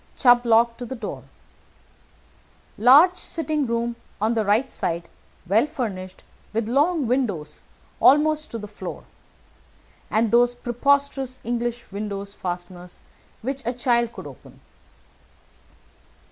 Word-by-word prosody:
Chubb 245 Hz, -1 st, +5 dB
lock 230 Hz, +1 st, +4 dB
to 245 Hz, -, -6 dB
the 260 Hz, -, -5 dB
door. 220 Hz, -4 st, -7 dB, 1.5 s
Large 295 Hz, -, +6 dB
sitting 310 Hz, -4 st, -1 dB
room 235 Hz, 0 st, -1 dB, 0.2 s
on 220 Hz, +3 st, +1 dB
the 225 Hz, -2 st, +1 dB
right 215 Hz, +6 st, +1 dB
side, 170 Hz, 0 st, -3 dB, 0.4 s
well 215 Hz, +9 st, +3 dB
furnished, 195 Hz, -11 st, -5 dB, 0.3 s
with 220 Hz, 0 st, -1 dB
long 290 Hz, +5 st, +2 dB
windows 215 Hz, -, -2 dB, 0.4 s
almost 305 Hz, +2 st, +4 dB
to 230 Hz, -, -5 dB
the 210 Hz, -1 st, -7 dB
floor, 205 Hz, -, -8 dB, 1.1 s
and 220 Hz, 0 st, +1 dB
those 245 Hz, +1 st, +4 dB
preposterous 270 Hz, +1 st, 0 dB
English 240 Hz, 0 st, -3 dB
window 200 Hz, 0 st, -4 dB
fasteners 180 Hz, -2 st, -7 dB, 0.4 s
which 270 Hz, +2 st, -3 dB
a 240 Hz, +2 st, -2 dB
child 240 Hz, -1 st, +1 dB
could -, -, -10 dB
open. -, -, -13 dB
235 Hz, 120 wpm, -23 LUFS, 210-265 Hz, 1.5 s, Large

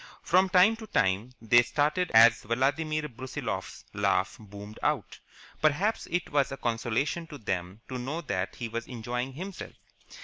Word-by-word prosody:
From 185 Hz, +2 st, +4 dB
time 185 Hz, +5 st, +5 dB
to 220 Hz, -1 st, -9 dB
time 95 Hz, -, +1 dB
they 120 Hz, +2 st, +5 dB
started 150 Hz, +9 st, 0 dB
as 115 Hz, +1 st, +7 dB
Vladimir 145 Hz, +7 st, 0 dB
Brusiloff's 130 Hz, -5 st, -6 dB
laugh -, -, +1 dB
boomed 105 Hz, 0 st, -11 dB
out. -, -, -1 dB, 0.4 s
Perhaps 170 Hz, +9 st, +1 dB
it 175 Hz, 0 st, -2 dB
was 140 Hz, -2 st, +2 dB
a 135 Hz, -, -5 dB
consolation 120 Hz, +8 st, -1 dB
to 150 Hz, -2 st, -9 dB
them 95 Hz, -2 st, -4 dB
to 130 Hz, -1 st, -5 dB
know 145 Hz, +7 st, -3 dB
that 95 Hz, -, -3 dB
he 120 Hz, -, -4 dB
was 115 Hz, +1 st, -5 dB
enjoying 125 Hz, +2 st, -4 dB
himself. 185 Hz, +6 st, -7 dB
130 Hz, 150 wpm, -28 LUFS, 115-155 Hz, 0.4 s, as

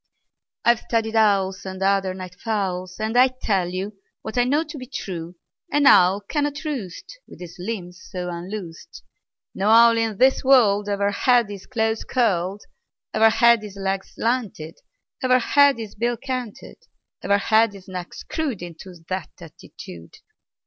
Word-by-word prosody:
"I've 235 Hz, -1 st, +4 dB
studied 225 Hz, -1 st, -2 dB
owls, 200 Hz, -3 st, +2 dB
And 190 Hz, 0 st, -6 dB
other 195 Hz, -1 st, +1 dB
night 185 Hz, -1 st, -8 dB
fowls, 185 Hz, -3 st, -3 dB
And 220 Hz, +2 st, -2 dB
I 250 Hz, +1 st, +7 dB
tell 205 Hz, -8 st, -1 dB
you 195 Hz, +3 st, -5 dB, 0.2 s
What 220 Hz, -, -6 dB
I 245 Hz, -1 st, +3 dB
know 290 Hz, +5 st, +1 dB
to 305 Hz, -2 st, -9 dB
be 255 Hz, -, -9 dB
true: 180 Hz, -9 st, -6 dB, 0.4 s
An 290 Hz, 0 st, +2 dB
owl 190 Hz, -3 st, +6 dB
cannot 290 Hz, +7 st, -3 dB
roost 275 Hz, -, -6 dB
With -, -, -14 dB
his 175 Hz, -2 st, -10 dB
limbs 180 Hz, -2 st, -6 dB
so 180 Hz, -2 st, -5 dB
unloosed; 175 Hz, 0 st, -8 dB, 0.5 s
No 200 Hz, +2 st, 0 dB
owl 230 Hz, +1 st, +6 dB
in 225 Hz, -3 st, -1 dB
this 260 Hz, +3 st, +3 dB
world 210 Hz, -6 st, +4 dB
Ever 200 Hz, 0 st, 0 dB
had 240 Hz, +1 st, +2 dB
his 200 Hz, -2 st, -9 dB
claws 225 Hz, -2 st, -1 dB
curled, 200 Hz, -5 st, 0 dB, 0.5 s
Ever 220 Hz, +1 st, +5 dB
had 235 Hz, 0 st, +4 dB
his 210 Hz, -2 st, -9 dB
legs 195 Hz, 0 st, -4 dB
slanted, 220 Hz, -10 st, -3 dB, 0.4 s
Ever 255 Hz, -1 st, +4 dB
had 280 Hz, +2 st, +4 dB
his 220 Hz, -3 st, -7 dB
bill 235 Hz, +2 st, -1 dB
canted, 255 Hz, -5 st, -6 dB, 0.4 s
Ever 200 Hz, -, +2 dB
had 220 Hz, +1 st, +3 dB
his 195 Hz, -2 st, -13 dB
neck 180 Hz, -2 st, -7 dB
screwed 280 Hz, -, -4 dB
Into 175 Hz, +2 st, -10 dB
that 185 Hz, -4 st, -4 dB
attitude. 85 Hz, -1 st, -12 dB
210 Hz, 155 wpm, -22 LUFS, 185-240 Hz, 0.5 s, I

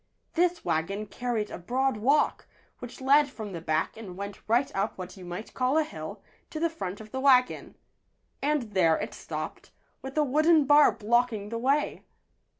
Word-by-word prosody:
This 350 Hz, 0 st, +1 dB
wagon 195 Hz, +7 st, -1 dB
carried 230 Hz, -1 st, -3 dB
a -, -, -6 dB
broad 260 Hz, +7 st, 0 dB
walk 275 Hz, +8 st, +2 dB, 0.3 s
which 245 Hz, +1 st, -9 dB
led 285 Hz, +2 st, +5 dB
from 215 Hz, -5 st, -7 dB
the 170 Hz, -, -5 dB
back 155 Hz, 0 st, -1 dB
and 195 Hz, -5 st, -9 dB
went 200 Hz, 0 st, -6 dB
right 240 Hz, +5 st, +1 dB
up 195 Hz, +3 st, -1 dB
what 185 Hz, -1 st, -7 dB
you 190 Hz, -, -11 dB
might 175 Hz, +5 st, -7 dB
call 255 Hz, +3 st, +1 dB
a 315 Hz, -, +4 dB
hill, 310 Hz, -, -8 dB, 0.3 s
to 310 Hz, -, -5 dB
the 335 Hz, 0 st, +1 dB
front 195 Hz, -, -5 dB
of 215 Hz, -1 st, -11 dB
the 265 Hz, -, -3 dB
wagon. 260 Hz, -2 st, +3 dB, 0.7 s
And 280 Hz, -7 st, -1 dB
there 165 Hz, -4 st, +4 dB
it -, -, -5 dB
stopped, -, -, -6 dB, 0.3 s
with 270 Hz, +2 st, -8 dB
a 305 Hz, -, +4 dB
wooden 305 Hz, +2 st, +4 dB
bar 290 Hz, +2 st, +7 dB
blocking 225 Hz, -1 st, 0 dB
the 230 Hz, +1 st, -3 dB
way. 275 Hz, +5 st, +1 dB
245 Hz, 180 wpm, -28 LUFS, 200-285 Hz, 0.7 s, bar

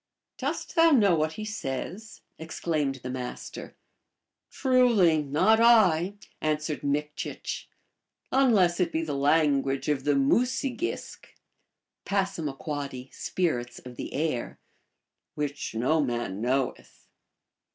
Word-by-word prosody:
* -, -, -62 dB
Dost -, -, -3 dB
thou 330 Hz, -1 st, +6 dB
know 215 Hz, -, +5 dB
what 155 Hz, -1 st, +1 dB
he 215 Hz, -, -6 dB
says? 215 Hz, +2 st, -5 dB
" -, -, -44 dB
exclaimed 155 Hz, -4 st, -2 dB
the 125 Hz, -, -4 dB
Mas 125 Hz, -1 st, -6 dB
/ter. -, -, -9 dB, 0.4 s
" -, -, -60 dB
Truly, 235 Hz, -, +3 dB
not 150 Hz, +10 st, +3 dB
I," 200 Hz, -6 st, +5 dB, 0.3 s
answered 155 Hz, 0 st, -1 dB
Mikchich, 145 Hz, +1 st, -3 dB, 0.3 s
" -, -, -57 dB, 0.3 s
unless 210 Hz, -10 st, +4 dB
it 180 Hz, -2 st, +1 dB
be 165 Hz, 0 st, -1 dB
the 155 Hz, -3 st, -3 dB
language 140 Hz, -1 st, +2 dB
of 140 Hz, -3 st, 0 dB
the 145 Hz, 0 st, +2 dB
Mu 140 Hz, -, +3 dB
se 260 Hz, 0 st, -2 dB
gisk 350 Hz, -, -5 dB, 0.8 s
(P., 145 Hz, -8 st, -3 dB
Spirits 120 Hz, -10 st, -2 dB
of 125 Hz, -1 st, -10 dB
the -, -, -6 dB
Air), 145 Hz, -5 st, -2 dB, 0.8 s
which 145 Hz, -5 st, -4 dB
no 135 Hz, +8 st, +2 dB
man 120 Hz, -6 st, -3 dB
knoweth." 130 Hz, +2 st, -2 dB
155 Hz, 130 wpm, -27 LUFS, 135-200 Hz, 0.8 s, thou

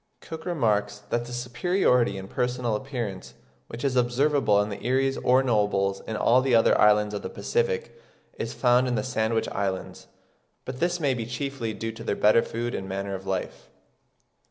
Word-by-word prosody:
Cook 160 Hz, +1 st, -8 dB
remarks 110 Hz, -12 st, 0 dB
that 120 Hz, 0 st, 0 dB
the 120 Hz, -, -10 dB
superiority 125 Hz, -, +1 dB
in 95 Hz, 0 st, -7 dB
personal 125 Hz, 0 st, -1 dB
appearance 115 Hz, -6 st, -5 dB, 0.3 s
"which 115 Hz, -, -8 dB
is 135 Hz, -2 st, 0 dB
observable 125 Hz, -2 st, +2 dB
in 105 Hz, +1 st, 0 dB
the 100 Hz, -, -6 dB
erees 135 Hz, +2 st, +1 dB
or 130 Hz, +2 st, +4 dB
nobles 105 Hz, -5 st, +1 dB
in 110 Hz, -, -3 dB
all 120 Hz, +4 st, +4 dB
the 130 Hz, -2 st, +2 dB
other 115 Hz, -, +5 dB
islands 105 Hz, 0 st, +4 dB
(of 105 Hz, -, -3 dB
the -, -, -5 dB
Pacific) 475 Hz, 0 st, -1 dB, 0.4 s
is -, -, -3 dB
found 125 Hz, 0 st, +3 dB
in 125 Hz, -, 0 dB
the 105 Hz, -, -1 dB
Sandwich 110 Hz, -2 st, 0 dB
Islands"; 95 Hz, -2 st, -4 dB, 0.6 s
but 130 Hz, 0 st, -6 dB
this 175 Hz, +1 st, 0 dB
may 140 Hz, -4 st, +1 dB
be 115 Hz, -3 st, -4 dB
chiefly 125 Hz, -3 st, -4 dB
due 115 Hz, 0 st, -4 dB
to 115 Hz, +1 st, -10 dB
their 100 Hz, -, -1 dB
better 105 Hz, +2 st, +5 dB
food 120 Hz, +1 st, -4 dB
and 95 Hz, -, -5 dB
manner 100 Hz, +1 st, -3 dB
of 95 Hz, 0 st, -7 dB
life. 95 Hz, -1 st, -4 dB
120 Hz, 180 wpm, -26 LUFS, 105-130 Hz, 0.6 s, other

